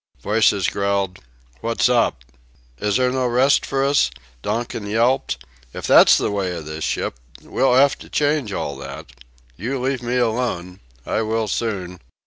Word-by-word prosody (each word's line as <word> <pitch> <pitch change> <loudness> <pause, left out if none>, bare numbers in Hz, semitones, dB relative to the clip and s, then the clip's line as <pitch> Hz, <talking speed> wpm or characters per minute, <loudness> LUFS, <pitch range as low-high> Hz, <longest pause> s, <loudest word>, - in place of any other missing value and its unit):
Voices 105 -3 +3
growled: 100 -2 -1 0.4
"What's 115 - +1
up?... 120 - +1 0.6
Is 105 +2 0
there 125 -1 +2
no 130 -1 0
rest 125 +3 +3
for 135 0 0
us?" 140 - +3 0.3
Donkin 115 - -3
yelped: 115 - 0 0.3
"If - - -5
that's - - +7
the - - -1
way 95 -3 -2
of 80 -3 -7
this 80 0 -6
ship, - - -2 0.2
we'll 130 -2 +2
'ave 140 +2 +5
to - - -12
change 145 -6 0
all - - -3
that.... - - -9 0.5
You 125 +7 -3
leave 130 0 -1
me 120 +1 -1
alone.... 110 -7 -1 0.3
I - - 0
will 110 0 -1
soon...." 95 -5 -3
115 Hz, 155 wpm, -21 LUFS, 100-125 Hz, 0.6 s, that's